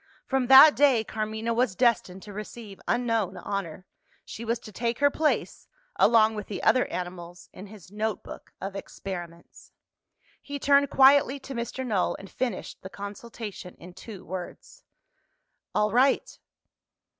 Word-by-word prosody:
From 265 -2 0
that 270 +4 +9
day, 270 -6 +4
Carmina 220 +1 -3
was 235 -4 +1
destined 195 -6 +1
to 205 - -10
receive 210 0 -9
unknown 225 -6 0
honour: 185 -1 -5 0.4
she 230 - -8
was 230 +1 -1
to 215 - -11
take 235 +3 -2
her 285 0 +3
place, 310 +1 -1 0.3
along 220 -1 +5
with 210 -2 -6
the 205 - -6
other 255 - +3
animals, 175 -1 -7
in 190 +3 -10
his 195 -3 -14
note 215 0 -3
book - - -11
of 195 +1 -6
experiments. 175 -4 -9 0.7
He 285 0 -6
turned 280 0 +3
quietly 275 0 +5
to 270 - -8
Mr. 235 +2 -4
Null, 210 -7 0
and 195 - -12
finished 245 -7 -4
the 190 - -8
consultation 205 -1 -8
in 180 +1 -13
two 195 0 -11
words. 185 -1 -8 0.9
"All 210 0 +2
right!" 260 +3 +2
215 Hz, 145 wpm, -26 LUFS, 190-245 Hz, 0.9 s, that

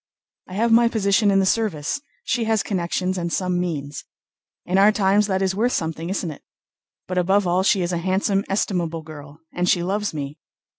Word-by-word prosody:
I 185 - -7
have 230 +3 +1
my 235 +1 +6
position 205 -2 +2
in 195 - +3
the 190 - +2
service, 195 - 0 0.2
she 235 -1 -1
has 220 -2 +1
connections 185 0 -2
and 170 -1 -3
some 180 -1 0
means. 145 -5 -4 0.6
In 185 +2 +1
our 205 +2 +6
times 205 0 +2
that 190 -1 0
is 190 0 +1
worth 235 +6 0
something, 165 +1 -3
isn't 185 -3 -2
it? 145 - -11 0.7
But 185 0 -1
above 190 +3 +2
all, 180 +1 +2
she 190 -1 +2
is 175 - -2
a 170 - 0
handsome, 195 +2 0
estimable 175 -5 -1
girl, 150 -1 -12
and 180 0 0
she 175 - +3
loves 205 +3 -1
me...." 145 0 -6
185 Hz, 195 wpm, -22 LUFS, 170-200 Hz, 0.7 s, my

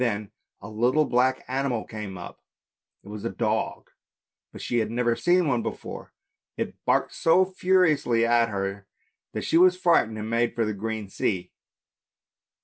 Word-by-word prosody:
Then 110 -4 -1 0.3
a 100 - -9
little 120 +8 +2
black 130 +1 +1
animal 130 -3 -1
came 105 -4 -7
up, 85 - -10 0.6
it - - -17
was 105 -1 -7
a - - -1
dog, - - -2 0.6
but - - -11
she 120 - -1
had 110 - -1
never 120 0 +1
seen 175 +2 +2
one 125 -4 +1
before; - - -7 0.5
it - - -3
barked - - +1
so 175 +3 +4
furiously 180 -11 +2
at 115 0 +3
her 100 -1 -4 0.5
that - - -3
she 165 - +3
was 180 0 +5
frightened 165 -12 +2
and 105 0 -5
made 115 +1 0
for 115 - +1
the 110 - -2
open 110 +1 -4
sea. 95 -1 -2
115 Hz, 160 wpm, -25 LUFS, 105-140 Hz, 0.6 s, was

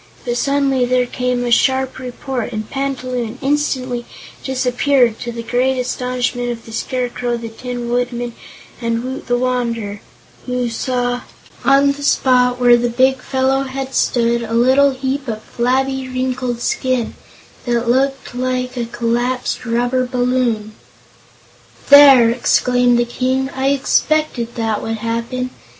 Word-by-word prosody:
But 240 -1 -1
suddenly 275 0 +1
there 250 0 +2
came 250 0 -2
a 240 - -1
sharp 260 +2 +2
report 250 -1 -4
and 215 -2 -4
Panta 275 -1 -3
Loon 245 -2 -3
instantly 260 -4 -1 0.4
disappeared, 255 -2 +1
to 240 - -4
the 235 0 -6
great 250 +3 +1
astonishment 250 -1 -2
of 235 -1 -5
the 225 - -11
Scarecrow, 245 0 -2
the 230 -1 -6
Tin 245 +1 -6
Woodman 240 0 -2 0.5
and 230 0 -1
Woot 260 +1 -6
the 245 -1 +2
Wanderer, 235 -5 -2 0.5
who 250 -1 -1
saw 245 +1 -1 0.4
on 275 +2 +4
the 285 +1 -7
spot 250 -3 +3
where 245 -1 +6
the 240 0 0
big 260 +2 +2
fellow 265 +1 +1
had 270 0 -5
stood 235 -2 +1
a 230 -1 -5
little 260 +4 +5
heap 265 +1 -3
of 220 -2 -4
flabby, 265 +2 -1
wrinkled 255 -1 -2
skin 255 -2 -1 0.5
that 235 0 0
looked 270 +2 0
like 255 0 -2
a 240 -1 -2
collapsed 240 +2 -2
rubber 245 +2 0
balloon. 245 -4 0 1.2
"There!" 275 -5 +9
exclaimed 245 0 +2
the 240 - +2
King; 260 +2 -1
"I 265 0 0
expected 275 -3 +1
that 225 -2 -1
would 225 0 -3
happen. 235 +3 -3
250 Hz, 140 wpm, -18 LUFS, 240-260 Hz, 1.2 s, There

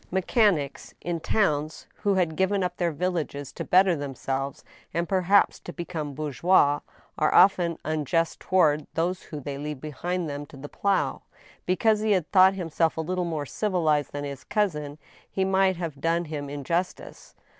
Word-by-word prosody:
Mechanics, 190 - +1
in 170 -1 -3
towns, 155 -5 0
who 205 -2 +1
have 170 -4 +1
given 190 +2 +1
up 180 0 -3
their 175 -2 0
villages 155 -4 -3
to - - -6
belter 185 -1 +4
themselves, 135 -1 -4 0.3
and 170 +1 0
perhaps 190 +2 +3
to - - -8
become 165 -5 -5
bourgeois 150 0 +3
^ - - -31 0.4
are 155 - +3
often 175 -3 +5
unjust 155 +2 0
to - - -17
ward 155 -5 +3
those 175 +3 0
whom 150 -3 -8
they 140 0 -5
leave 150 -1 -5
behind 170 +5 -3
them 145 0 -5
to 140 - -13
the 140 +2 -8
plow. 200 +4 0 0.5
Because 210 +4 +3
he 215 -1 +2
had 185 -5 -1
thought 190 0 +6
himself 165 -3 0
a - - 0
little 180 +2 -2
more 155 -4 -3
civilized 160 -5 0
than 145 0 -5
his 140 -2 -6
cousin, 150 -9 -1 0.3
he 190 - 0
might 190 0 +3
have 165 -5 -5
done 170 +2 +1
him 145 -2 -5
injustice. 165 +6 -4
165 Hz, 170 wpm, -26 LUFS, 145-185 Hz, 0.5 s, thought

